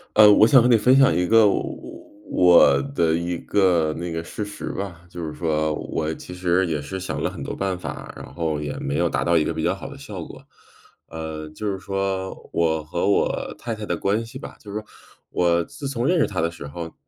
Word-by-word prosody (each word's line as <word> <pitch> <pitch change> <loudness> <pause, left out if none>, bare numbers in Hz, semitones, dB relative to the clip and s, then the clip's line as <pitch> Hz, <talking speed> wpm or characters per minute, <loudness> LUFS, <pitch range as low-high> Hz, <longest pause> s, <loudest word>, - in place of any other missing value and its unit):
呃， 105 -1 +9
我 105 - +7
想 130 +3 +7
和 120 - +3
你 120 -2 +6
分 125 +5 +4
享 135 0 +5
一 90 - +1
个 110 +3 +6
我 100 - -3 0.3
我 85 -6 +6
的 80 -1 +3
一 85 +1 -2
个 85 -6 +2
那 85 +1 -5
个 80 0 -4
事 105 - -5
实 105 0 -7
吧， 90 -4 -6
就 85 -1 -8
是 80 - -4
说 80 -2 0
我 80 +1 -3
其 90 - -10
实 90 +1 +1
也 75 -3 -2
是 85 +7 -5
想 95 - -4
了 - - 0
很 - - -9
多 - - -4
办 95 -2 -2
法， - - -7
然 - - -10
后 80 -3 -1
也 75 -1 -4
没 70 +1 -2
有 85 0 +2
达 - - -1
到 85 0 +2
一 75 - +2
个 - - -2
比 - - -3
较 - - +2
好 - - -7
的 - - -10
效 - - -8
果。 - - -12 0.7
呃， 80 -1 -6
就 105 +7 -5
是 95 - -3
说 95 -1 -3
我 80 -2 +1
和 85 +5 -2
我 100 - 0
太 120 - -5
太 105 -1 -6
的 - - -1
关 105 +4 0
系 115 - -12
吧， - - -9
就 105 - -10
是 105 - -2
说， 105 - -18 0.4
我 85 -1 +2
自 140 - -7
从 125 -3 -2
认 180 - +3
识 150 - +4
她 95 -5 -3
的 85 - +1
时 85 -4 -9
候， 80 +3 -7
90 Hz, 255 characters per minute, -23 LUFS, 80-105 Hz, 0.7 s, 呃